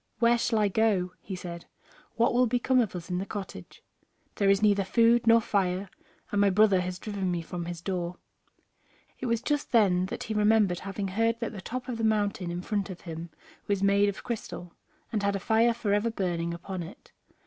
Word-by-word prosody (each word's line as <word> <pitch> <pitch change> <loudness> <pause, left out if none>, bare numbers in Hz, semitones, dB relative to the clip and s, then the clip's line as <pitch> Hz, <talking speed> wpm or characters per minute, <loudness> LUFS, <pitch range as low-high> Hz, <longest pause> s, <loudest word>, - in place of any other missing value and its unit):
"Where 235 0 +3
shall 230 -1 +1
I 210 -1 +3
go?" 195 -3 +1
he 190 +2 -6
said; 170 -2 -8 0.5
"what 235 +1 +2
will 250 +1 +4
become 250 +2 +2
of 215 -6 -2
us 175 +1 -7
in 180 - 0
the 195 - -3
cottage? 190 - -8 0.5
There 200 -1 +3
is 195 +1 +3
neither 205 -1 +4
food 230 +4 +3
nor 230 0 +7
fire, 195 -2 -1 0.4
and 205 - +2
my 200 - +5
brother 195 -1 +4
has 180 0 -4
driven 195 -1 -3
me 175 -2 -2
from 175 +1 -5
his 170 -1 -6
door." 180 -1 -3 1.0
It 255 - -3
was 230 +1 0
just 295 0 -1
then 190 -5 +3 0.2
he 220 - -3
remembered 210 -4 +3
having 195 0 -4
heard 225 +4 +1
that 230 - -3
the 205 -4 -8
top 250 +6 -5
of 240 -3 -4
the - - -2
mountain 205 -4 +1
in 175 +1 -4
front 205 -1 -2
of 185 -2 -8
him 165 0 -7 0.4
was 200 -1 0
made 200 +1 +4
of 200 - -6
crystal, 215 -7 -6 0.4
and 215 -3 -1
had 200 0 +1
a - - -1
fire 225 +4 +3
forever 215 -1 0
burning 175 -6 -2
upon 175 +2 -5
it. 170 +3 -11
200 Hz, 205 wpm, -28 LUFS, 180-225 Hz, 1.0 s, nor